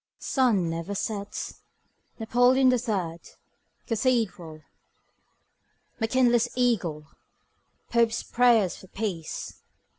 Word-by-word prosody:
Sun 230 - +1
never 165 +4 -4
sets. 205 0 -5 0.6
Napoleon 245 +3 +4
the 250 -1 +3
third, 190 -8 -2 0.7
cathedral. 210 -10 -1 1.4
McKinley's 240 0 +2
eagle. 190 -12 0 0.9
Pope's 235 -1 +2
prayers 235 -6 +3
for 190 - -14
peace. 185 -6 -5
225 Hz, 80 wpm, -26 LUFS, 180-245 Hz, 1.4 s, Napoleon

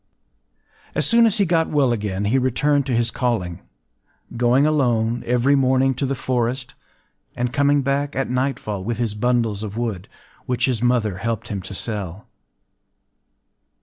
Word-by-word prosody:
As - - +1
soon 230 0 +5
as 220 0 0
he 200 - +3
got 165 -2 +1
well 140 -4 +2
again, 100 -3 -2
he 125 +6 +2
returned 140 +3 +1
to 125 - 0
his 115 0 +1
calling,—going 120 - -2
alone 120 -6 +1
every 125 +3 +3
morning 130 0 +3
to 130 +2 -2
the 135 - -1
forest, 125 +1 -2 0.6
and 125 +1 -2
coming 145 0 +3
back 140 +2 -1
at 135 - -1
nightfall 125 -6 -2
with 115 +2 -3
his 115 -3 -1
bundles 115 -2 0
of 105 0 -6
wood, 110 -6 -3 0.4
which 125 -1 +1
his 125 -4 -1
mother 120 -6 +1
helped 115 +2 -3
him 100 -3 -3
to 95 +2 -8
sell. 100 -3 -5
120 Hz, 150 wpm, -21 LUFS, 110-135 Hz, 0.6 s, soon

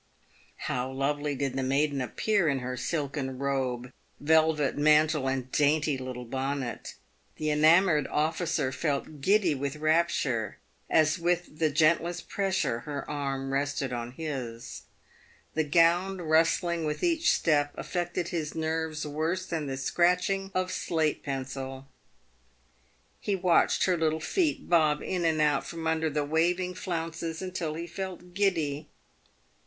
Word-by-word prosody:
How 125 +1 -2
lovely 145 +2 -1
did 135 -1 -2
the 135 - -1
maiden 140 +1 +1
appear 200 - +1
in 140 -2 +2
her 125 0 -4
silken 140 -2 -3
robe, 130 -2 -2 0.3
velvet 155 -1 +3
mantle, 150 -1 +3
and 130 -1 -3
dainty 150 0 +2
little 130 -1 -6
bonnet! 135 0 -3 0.4
The 155 0 -1
enamoured 155 +1 +4
officer 155 -2 0
felt 145 0 -3
giddy 190 0 +3
with 140 +1 -3
rapture 155 - +1 0.3
as 155 +2 +3
with 175 -2 -1
the 160 -1 +3
gentlest 165 +3 +2
pressure 190 - 0
her 145 +3 -6
arm 135 -2 -3
rested 140 -2 -1
on 120 0 -4
his. 120 - -5 0.7
The 160 - +1
gown 170 +5 +3
rustling 165 +1 +2
with 150 -1 -3
each 340 -1 +3
step 145 -3 +2
affected 175 -1 -2
his 160 -3 -3
nerves 160 -1 -2
worse 160 +5 -2
than 160 -5 -3
the 135 -1 -3
scratching 180 +7 +1
of 185 0 0
slate 160 -4 0
pencil. 135 -1 -5 1.3
He 205 - -1
watched 180 -2 +3
her 185 -2 +2
little 160 -1 +1
feet 315 - 0
bob 155 -4 +3
in 180 -2 -1
and 160 -1 +2
out 150 -2 +2
from 165 -1 -7
under 160 0 +1
the 150 0 -1
waving 175 +4 +1
flounces 165 -2 -4
until 180 -4 -3
he 170 +1 -4
felt 180 0 -7
giddy. 160 -7 0
155 Hz, 135 wpm, -28 LUFS, 140-170 Hz, 1.3 s, enamoured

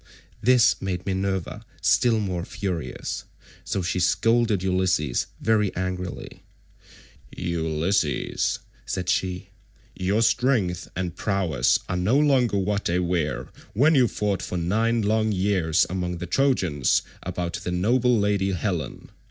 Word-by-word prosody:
This 125 0 +4
made 95 -1 -3
Minerva 95 +2 -2 0.2
still 120 -3 +3
more 90 -5 -2
furious, 90 -4 -4 0.4
so 95 - -2
she 85 +1 -1
scolded 115 +1 +2
Ulysses 90 -8 +1
very 105 -3 +2
angrily.173 90 0 -8
"Ulysses," 80 0 0 0.3
said 90 -1 -4
she, 90 -1 -1 0.5
"your 100 +5 +1
strength 110 -7 +1
and 90 -2 -3
prowess 90 - +1
are 90 - -2
no 100 +9 +2
longer 135 -7 +3
what 100 +1 -1
they 85 - +1
were 80 -8 -1 0.2
when 145 +9 +4
you 130 -5 +5
fought 105 -3 -1
for 90 - -4
nine 110 +7 +1
long 110 +1 +1
years 95 -4 +2
among 90 -1 -3
the 90 - -5
Trojans 90 - +1 0.2
about 85 -1 -3
the - - -3
noble 120 +7 +2
lady 100 -2 +1
Helen. 85 - -3
95 Hz, 125 wpm, -24 LUFS, 90-110 Hz, 0.5 s, you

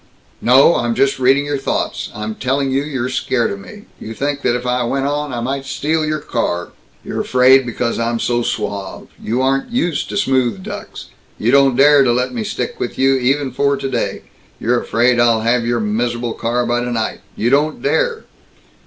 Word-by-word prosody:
"No. 135 +7 +5
I'm 120 -1 -1
just 135 -1 +1
reading 135 +3 +3
your 145 -1 -2
thoughts. 135 - -2
I'm 105 +1 -4
telling 135 +4 -1
you 135 +1 +1
you're 135 -4 -3
scared 125 -2 0
of 100 - -5
me! 205 - -12 0.2
You 110 +1 -8
think 145 +2 -2
that 120 - +1
if 125 0 -4
I 125 0 0
went 135 +3 -1
on, 145 0 -2
I 120 -1 -3
might 135 +3 -3
steal 155 +3 -1
your 155 0 -1
car! 90 - -3 0.3
You're - - -3
afraid 130 +1 +4
because 115 0 -2
I'm 115 0 -1
so 120 0 0
suave. 100 -4 -4
You 120 +4 -1
aren't 135 +1 0
used 175 - -1
to - - -3
smooth 130 - +1
ducks. 205 0 -8 0.3
You 115 - +1
don't 135 -2 +4
dare 145 +2 +6
to 125 - +3
let 125 +1 0
me 115 -3 -3
stick - - -4
with - - -4
you, 135 +1 +3
even 135 +2 0
for 140 0 +1
today! 135 0 -3 0.4
You're 120 +1 +1
afraid 120 +1 +2
I'd 115 -2 +3
have 115 0 +1
your 120 0 +1
mis'able 120 +2 -1
car 120 +1 -1
by 120 0 0
tonight! 120 -2 -2
You 120 +3 0
don't 150 +3 +1
dare!" 485 -2 0
125 Hz, 195 wpm, -18 LUFS, 120-140 Hz, 0.4 s, dare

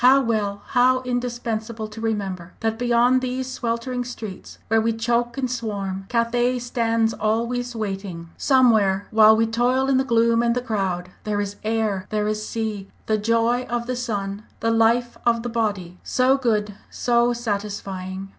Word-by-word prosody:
How 260 +2 +7
well, 210 -5 -1
how 255 0 +4
indispensable 235 -3 -3
to 220 +1 -9
remember, 195 -6 -3
that 225 0 -1
beyond 245 +1 +3
these 255 0 -2
sweltering 245 0 -2
streets 225 -5 -8
where 225 0 +3
we 230 +1 +1
choke 235 +2 0
and 270 - 0
swarm, 200 -5 -4
Cathay 240 +1 +1
stands 230 -2 0
always 235 +3 -1
waiting! 195 -6 -5
Somewhere, 220 -8 +3
while 220 0 +7
we 225 - +3
toil 245 +4 +1
in 265 - +4
the 265 - +3
gloom 230 -2 +3
and 235 0 +2
the - - +1
crowd, 190 -6 -2
there 210 -1 -1
is 205 0 -3
air, 215 -3 -1
there 210 -1 0
is 215 0 -1
sea, 215 -4 -3 0.2
the 215 -1 +1
joy 230 +3 +1
of 240 0 -1
the 255 +1 -2
sun, 205 -5 -3 0.2
the 230 - +1
life 230 +2 +2
of 230 -1 +2
the 240 - -3
body, 205 -6 -2
so 255 +1 +2
good, 215 -6 0 0.2
so 240 0 +2
satisfying! 200 -4 -4
225 Hz, 165 wpm, -23 LUFS, 210-245 Hz, 0.2 s, How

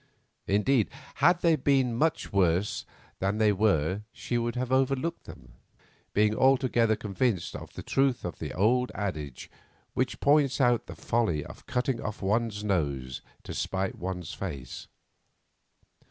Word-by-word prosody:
Indeed, 105 +4 +2 0.3
had 175 +4 +5
they 165 -2 +4
been 135 -3 +2
much 155 -1 0
worse 95 +1 +1 0.3
than 100 +2 0
they 110 -1 +4
were 95 -3 +1
she 120 - -4
would 120 0 0
have 125 0 -2
overlooked 135 +5 +1
them, 60 -3 -12 0.6
being 105 +1 +3
altogether 130 -4 +3
convinced 105 -2 -1
of - - -8
the - - -6
truth 135 -5 +1
of 85 -7 -5
the - - -4
old 125 +6 +2
adage 75 -10 -4 0.5
which 130 0 -1
points 145 -2 +3
out 120 -3 +3
the - - -8
folly 100 -11 0
of - - -12
cutting 125 -1 -1
off 105 0 -4
one's 105 +1 0
nose 70 -10 -1 0.2
to - - -7
spite 95 0 -2
one's 90 -2 -5
face. 75 -7 -6
110 Hz, 140 wpm, -28 LUFS, 95-130 Hz, 0.6 s, had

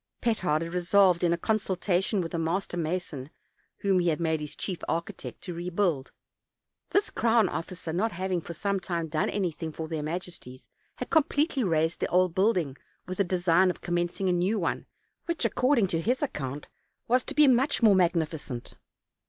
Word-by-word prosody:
Petard 185 -10 +1
had 165 +1 -6
re 180 - 0
solved, 185 -1 +4
in 170 - +3
a 170 - +2
consultation 190 -1 0
with 165 - -5
a 170 - -1
master 175 +3 -1
mason, 160 -5 -3 0.5
whom 195 -2 +3
he 175 - +1
had 160 -1 +1
made 160 -2 0
his 150 -1 -6
chief 185 -4 -4
architect, 170 +1 -4
to 180 - -6
rebuild. 175 -4 -1 0.8
This 405 +1 +1
crown 225 -2 +3
officer, 175 -1 -5
not 215 +6 +1
having 185 0 -1
for 170 - -7
some 200 +3 -1
time 170 -2 -3
done 155 0 0
anything 170 -5 -2
for 160 +1 -6
their 160 -1 -3
majesties, 155 -5 -6 0.3
had - - -6
completely 295 -3 +2
razed 160 -3 +1
the - - 0
old 180 -1 +2
building, 180 -8 +1 0.3
with 185 +1 -6
the - - +5
design 180 0 +3
of 180 - -4
commencing 175 +2 -1
a 180 - +3
new 180 +5 +1
one, 170 -5 -2 0.4
which, 335 -7 -1
according 250 0 +3
to 165 -1 0
his 250 - 0
account, 145 - -4 0.4
was 250 +2 +3
to - - -6
be 300 -1 +6
much 260 +1 +3
more 215 -3 +7
magnificent. 160 -8 0
180 Hz, 180 wpm, -28 LUFS, 165-200 Hz, 0.8 s, more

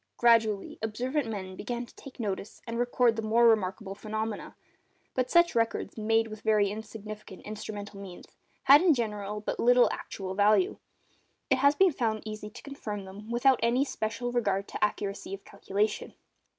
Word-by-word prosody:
Gradually, 225 -4 +3
observant 245 +5 -1
men 190 -3 -5
began 240 +4 -4
to 275 - -13
notice 205 -3 -4
and 230 0 -4
record 245 -1 +3
the 225 - -2
more 230 +2 +4
remarkable 195 -2 +1
phenomena. 215 +1 -4 0.6
But 255 -1 0
such 345 0 +5
records, 230 -1 0
made 225 +1 +2
with 215 -1 -9
very 210 -2 +3
insufficient 215 -2 -8
instrumental 205 -1 -7
means, 190 -3 -9 0.4
had 285 +3 +8
in 350 -5 +5
general 210 -3 -3
but - - -3
little 245 +1 +5
actual 190 -1 -5
value: 215 - +3 0.7
it 265 - +4
has 280 +2 +5
been 380 +3 +5
found 220 -5 -1
easy 215 -1 -6
to - - -12
confirm 210 -8 -6
them 200 +3 -10
without 245 +2 +3
any 240 +4 +2
special 230 -1 -3
regard 200 -5 0
to - - -3
accuracy 205 -2 -2
of 195 - -17
calculation. 205 +2 -2
220 Hz, 160 wpm, -29 LUFS, 205-240 Hz, 0.7 s, had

